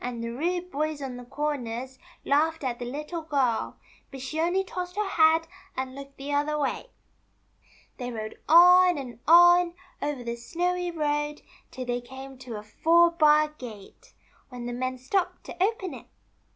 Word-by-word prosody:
the 235 Hz, -1 st, -4 dB
rude 350 Hz, +7 st, -2 dB
boys 305 Hz, 0 st, -2 dB
on 265 Hz, -3 st, -5 dB
the 245 Hz, -, -8 dB
corners 260 Hz, -2 st, -4 dB, 0.3 s
laughed 315 Hz, +2 st, +2 dB
at 245 Hz, -2 st, -2 dB
the 245 Hz, -, -4 dB
Little 300 Hz, +4 st, -5 dB
Girl; 275 Hz, -7 st, 0 dB, 0.3 s
but 270 Hz, -, -9 dB
she 270 Hz, +5 st, -4 dB
only 350 Hz, +4 st, +2 dB
tossed 360 Hz, -1 st, -6 dB
her 420 Hz, -1 st, 0 dB
head, 325 Hz, -3 st, +4 dB, 0.3 s
and 260 Hz, 0 st, -3 dB
looked 275 Hz, 0 st, -11 dB
the 280 Hz, +1 st, -5 dB
other 295 Hz, +1 st, +1 dB
way. 290 Hz, -, -2 dB, 1.1 s
They 245 Hz, -2 st, -5 dB
rode 215 Hz, -2 st, -7 dB
on 360 Hz, +1 st, +7 dB
and 250 Hz, -4 st, -7 dB
on, 350 Hz, +1 st, +7 dB, 0.3 s
over 285 Hz, -4 st, -3 dB
the 235 Hz, 0 st, -4 dB
snowy 355 Hz, +8 st, -2 dB
road, 295 Hz, -2 st, -2 dB, 0.3 s
till 255 Hz, -1 st, -6 dB
they 245 Hz, 0 st, -2 dB
came 265 Hz, +1 st, -10 dB
to 250 Hz, -3 st, -7 dB
a 210 Hz, -, -8 dB
four 335 Hz, +10 st, +4 dB
bar 305 Hz, -2 st, +4 dB
gate, 235 Hz, -9 st, -12 dB, 0.3 s
when 245 Hz, -2 st, -7 dB
the 240 Hz, -, -4 dB
men 255 Hz, +1 st, -3 dB
stopped 345 Hz, +9 st, -1 dB
to 365 Hz, -, -3 dB
open 390 Hz, -3 st, -1 dB
it. -, -, -11 dB
290 Hz, 165 wpm, -27 LUFS, 255-340 Hz, 1.1 s, on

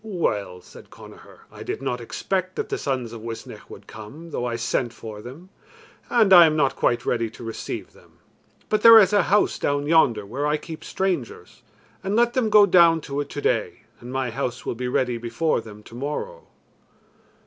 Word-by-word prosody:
"Well," 105 Hz, -, -3 dB
said -, -, -15 dB
Connachar, -, -, -15 dB
"I -, -, -12 dB
did -, -, -4 dB
not 125 Hz, -2 st, -3 dB
expect 185 Hz, +9 st, -3 dB
that -, -, -4 dB
the -, -, -3 dB
sons 130 Hz, -4 st, -3 dB
of 115 Hz, -, -9 dB
Uisnech 115 Hz, 0 st, -9 dB
would -, -, -12 dB
come, 140 Hz, +11 st, -11 dB
though 125 Hz, -, -3 dB
I 120 Hz, -1 st, -2 dB
sent 120 Hz, +1 st, -2 dB
for 110 Hz, -2 st, -9 dB
them, 140 Hz, -, -12 dB, 0.6 s
and 220 Hz, -5 st, +4 dB
I 175 Hz, -2 st, +9 dB
am 155 Hz, -, 0 dB
not 140 Hz, -3 st, +1 dB
quite 120 Hz, 0 st, 0 dB
ready 115 Hz, -2 st, -1 dB
to 115 Hz, -, -13 dB
receive 115 Hz, -1 st, -6 dB
them. -, -, -22 dB, 0.5 s
But 215 Hz, -1 st, 0 dB
there 230 Hz, 0 st, +10 dB
is 210 Hz, -1 st, +5 dB
a 205 Hz, -, +5 dB
house 205 Hz, +4 st, +1 dB
down 145 Hz, 0 st, -1 dB
yonder 145 Hz, -10 st, +3 dB
where 135 Hz, +8 st, -3 dB
I 150 Hz, +1 st, +1 dB
keep 160 Hz, +1 st, -10 dB
strangers, 155 Hz, -, -4 dB, 0.4 s
and 195 Hz, +2 st, -2 dB
let 240 Hz, +1 st, +3 dB
them 245 Hz, -4 st, +1 dB
go 210 Hz, -1 st, +7 dB
down 170 Hz, -3 st, +5 dB
to 140 Hz, 0 st, -4 dB
it 145 Hz, -, -7 dB
today, 145 Hz, -, -2 dB, 0.2 s
and 120 Hz, +1 st, -10 dB
my 130 Hz, -2 st, -2 dB
house 125 Hz, 0 st, -4 dB
will -, -, -2 dB
be 125 Hz, +2 st, -4 dB
ready 125 Hz, -1 st, -1 dB
before 120 Hz, +6 st, -1 dB
them 105 Hz, -1 st, -13 dB
tomorrow." 150 Hz, -, -6 dB
140 Hz, 190 wpm, -23 LUFS, 115-180 Hz, 0.6 s, there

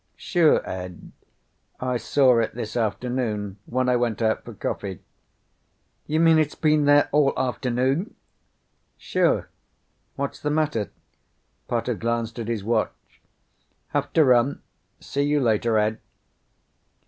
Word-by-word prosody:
"Sure, 170 Hz, -5 st, +2 dB
Ed. 90 Hz, -2 st, -7 dB, 0.7 s
I 125 Hz, -1 st, -1 dB
saw 125 Hz, +1 st, +3 dB
it 115 Hz, -, -1 dB
this 110 Hz, -3 st, -5 dB
afternoon 110 Hz, -3 st, -2 dB
when 130 Hz, +1 st, 0 dB
I 125 Hz, -, +3 dB
went 120 Hz, -3 st, -1 dB
out 110 Hz, -1 st, 0 dB
for 120 Hz, -, -10 dB
coffee." 95 Hz, -2 st, -4 dB, 1.0 s
"You 155 Hz, +1 st, 0 dB
mean 165 Hz, -1 st, +5 dB
it's 150 Hz, -2 st, 0 dB
been 150 Hz, -2 st, +2 dB
there 145 Hz, 0 st, +5 dB
all 145 Hz, -1 st, +3 dB
afternoon?" 130 Hz, -, -1 dB, 0.8 s
"Sure. -, -, +1 dB, 0.7 s
What's 140 Hz, 0 st, -4 dB
the 150 Hz, -, -2 dB
matter?" 150 Hz, -, 0 dB, 0.8 s
Potter -, -, -1 dB
glanced 115 Hz, 0 st, -2 dB
at 115 Hz, -, -4 dB
his 115 Hz, -4 st, -2 dB
watch. 115 Hz, +3 st, -3 dB, 0.7 s
"Have -, -, -1 dB
to 160 Hz, -, +5 dB
run. 125 Hz, +2 st, +3 dB, 0.4 s
See 140 Hz, -, -3 dB
you 145 Hz, +1 st, +2 dB
later, 115 Hz, -2 st, +2 dB
Ed." 105 Hz, +1 st, +1 dB
125 Hz, 125 wpm, -24 LUFS, 110-145 Hz, 1.0 s, mean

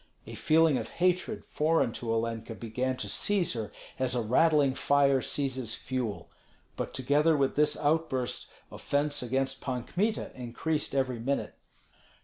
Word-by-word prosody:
A -, -, -9 dB
feeling 160 Hz, -3 st, +3 dB
of -, -, -6 dB
hatred 180 Hz, +4 st, +1 dB
foreign 155 Hz, -5 st, +1 dB
to 115 Hz, 0 st, -4 dB
Olenka 115 Hz, 0 st, -2 dB
began 125 Hz, +4 st, -2 dB
to 105 Hz, -, -5 dB
seize 190 Hz, -, +1 dB
her 110 Hz, -4 st, -4 dB, 0.3 s
as 130 Hz, -1 st, +1 dB
a 120 Hz, -, +1 dB
rattling 145 Hz, +4 st, +4 dB
fire 140 Hz, -1 st, +3 dB
seizes 130 Hz, -6 st, -2 dB
fuel; 125 Hz, -5 st, -4 dB, 0.4 s
but -, -, -4 dB
together 145 Hz, +5 st, +2 dB
with 135 Hz, -1 st, +1 dB
this 150 Hz, +1 st, +2 dB
outburst 145 Hz, -5 st, 0 dB, 0.2 s
offence 145 Hz, +1 st, -1 dB
against 135 Hz, +2 st, -1 dB
Pan 125 Hz, -2 st, -3 dB
Kmita 210 Hz, -, -1 dB
increased 135 Hz, +5 st, -3 dB
every 130 Hz, -3 st, 0 dB
minute. 135 Hz, +5 st, -2 dB
135 Hz, 140 wpm, -29 LUFS, 125-150 Hz, 0.4 s, rattling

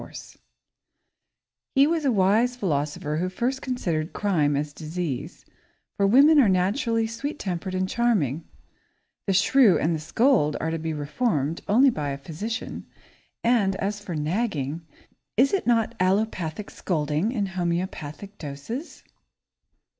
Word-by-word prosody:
[Sidenote: -, -, -12 dB
Nagging] -, -, -11 dB, 1.3 s
He 275 Hz, +1 st, +6 dB
was 320 Hz, -1 st, 0 dB
a 270 Hz, -, +3 dB
wise 220 Hz, +4 st, +3 dB
philosopher 150 Hz, -6 st, -2 dB
who 180 Hz, +3 st, -1 dB
first 250 Hz, +8 st, -2 dB
considered 170 Hz, -11 st, -2 dB
crime 155 Hz, -8 st, +1 dB
as 145 Hz, 0 st, -3 dB
disease, 160 Hz, -4 st, -5 dB, 0.5 s
for 200 Hz, -, +2 dB
women 285 Hz, +8 st, +6 dB
are 235 Hz, -7 st, +5 dB
naturally 225 Hz, +5 st, +1 dB
sweet 235 Hz, +7 st, -4 dB
tempered 185 Hz, -2 st, -4 dB
and 185 Hz, 0 st, 0 dB
charming. 185 Hz, -, +1 dB, 0.8 s
The 195 Hz, -, +2 dB
shrew 200 Hz, +2 st, +5 dB
and 165 Hz, +2 st, +1 dB
the 160 Hz, -, -2 dB
scold 195 Hz, -, +2 dB
are 160 Hz, -, -2 dB
to 165 Hz, -, -2 dB
be 160 Hz, 0 st, -3 dB
reformed 150 Hz, -, -1 dB
only 255 Hz, +6 st, +5 dB
by 150 Hz, -8 st, -3 dB
a 140 Hz, -, -3 dB
physician, 180 Hz, -, -5 dB, 0.6 s
and 215 Hz, -5 st, +3 dB
as 200 Hz, +2 st, -2 dB
for 195 Hz, -5 st, -6 dB
nagging, 155 Hz, -, -2 dB, 0.6 s
is 265 Hz, -, +4 dB
it 390 Hz, -, 0 dB
not 230 Hz, -2 st, +2 dB
allopathic 185 Hz, -1 st, -1 dB
scolding 155 Hz, +4 st, -1 dB
in 215 Hz, -5 st, -1 dB
homeopathic 180 Hz, 0 st, -4 dB
doses? 155 Hz, -, -7 dB
190 Hz, 140 wpm, -25 LUFS, 155-230 Hz, 1.3 s, He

